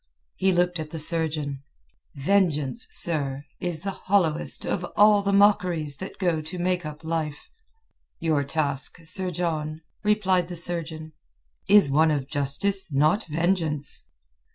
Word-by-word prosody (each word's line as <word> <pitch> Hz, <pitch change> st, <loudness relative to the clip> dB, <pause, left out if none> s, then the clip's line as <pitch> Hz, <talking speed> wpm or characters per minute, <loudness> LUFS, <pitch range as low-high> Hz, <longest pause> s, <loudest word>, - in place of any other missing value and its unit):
He 190 Hz, 0 st, +2 dB
looked 180 Hz, -1 st, +1 dB
at 155 Hz, -1 st, -5 dB
the 165 Hz, -, -6 dB
surgeon. 155 Hz, -3 st, -1 dB, 0.5 s
"Vengeance, 150 Hz, -4 st, +1 dB
sir, 145 Hz, -4 st, -1 dB
is 175 Hz, -3 st, -2 dB
the 195 Hz, -, -2 dB
hollowest 185 Hz, -5 st, 0 dB
of 180 Hz, -, -2 dB
all 210 Hz, 0 st, +6 dB
the 200 Hz, 0 st, 0 dB
mockeries 180 Hz, -7 st, +3 dB
that 190 Hz, -, -8 dB
go 175 Hz, -4 st, 0 dB
to 160 Hz, +4 st, -8 dB
make 180 Hz, -2 st, -1 dB
up 150 Hz, +1 st, -9 dB
life." 160 Hz, -2 st, -3 dB, 0.7 s
"Your 155 Hz, -4 st, 0 dB
task, 140 Hz, -2 st, -1 dB
Sir 185 Hz, +3 st, +2 dB
John," 155 Hz, -3 st, -3 dB, 0.2 s
replied 190 Hz, -4 st, +2 dB
the 175 Hz, -, -7 dB
surgeon, 160 Hz, -2 st, -3 dB, 0.6 s
"is 200 Hz, -8 st, +6 dB
one 160 Hz, +3 st, +4 dB
of 145 Hz, -3 st, -1 dB
justice, 175 Hz, +7 st, +1 dB
not 155 Hz, +10 st, +2 dB
vengeance." 160 Hz, -3 st, -1 dB
165 Hz, 135 wpm, -25 LUFS, 150-185 Hz, 0.7 s, all